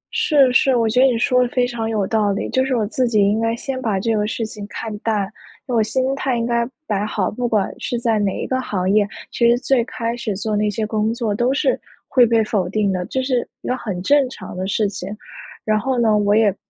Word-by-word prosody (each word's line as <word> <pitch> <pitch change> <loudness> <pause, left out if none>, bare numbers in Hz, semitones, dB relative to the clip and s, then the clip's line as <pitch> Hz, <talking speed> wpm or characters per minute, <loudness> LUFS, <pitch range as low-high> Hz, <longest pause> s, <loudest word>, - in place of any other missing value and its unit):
是， 275 -4 +4
是， 265 +1 +4
我 230 -2 +2
觉 240 +3 +1
得 265 - +7
你 245 -3 +1
说 250 +2 +3
的 245 - +1
非 250 -3 +1
常 235 -2 -3
有 215 -3 0
道 210 -1 +1
理。 200 - -2
就 260 - +2
是 265 -1 0
我 220 -3 +1
自 250 +4 0
己 220 -3 +2
应 205 +2 +3
该 225 0 +1
先 260 +2 -5
把 215 -6 0
这 225 +2 0
个 210 0 0
事 225 +1 -2
情 215 -1 -7
看 220 +1 -6
淡， 215 -3 0 0.4
因 250 - -3
为 - - +2
我 - - +4
心 255 +4 0
态 265 -3 -1
应 230 - -1
该 235 0 0 0.2
摆 205 -1 -1
好， 210 -2 -1
不 245 +2 -2
管 210 -4 +1
是 240 - -2
在 230 -3 +1
哪 200 -2 +1
一 - - -3
个 260 0 -1
行 185 -6 -2
业， 205 0 +3 0.2
其 235 -1 +3
实 240 - +4
最 255 -1 +1
开 230 -2 -3
始 220 -4 -3
做 215 +1 -2
那 210 0 +1
些 215 +1 -2
工 215 0 0
作 230 -3 -1
都 240 +5 +1
是 400 - +1 0.3
会 250 -3 +5
被 225 -1 +3
否 205 -5 -1
定 200 -1 +1
的， 180 -1 -2
这 260 0 -2
是 255 -2 0
一 - - -8
个 250 - +1
很 205 -8 -4
正 280 +3 +3
常 190 -8 -9
的 185 +1 -3
事 205 +1 +1
情。 195 -1 -6 0.6
然 215 0 +2
后 260 +2 -1
呢， 220 -2 +3
我 205 0 +3
也 210 -3 +3
225 Hz, 280 characters per minute, -20 LUFS, 210-245 Hz, 0.6 s, 得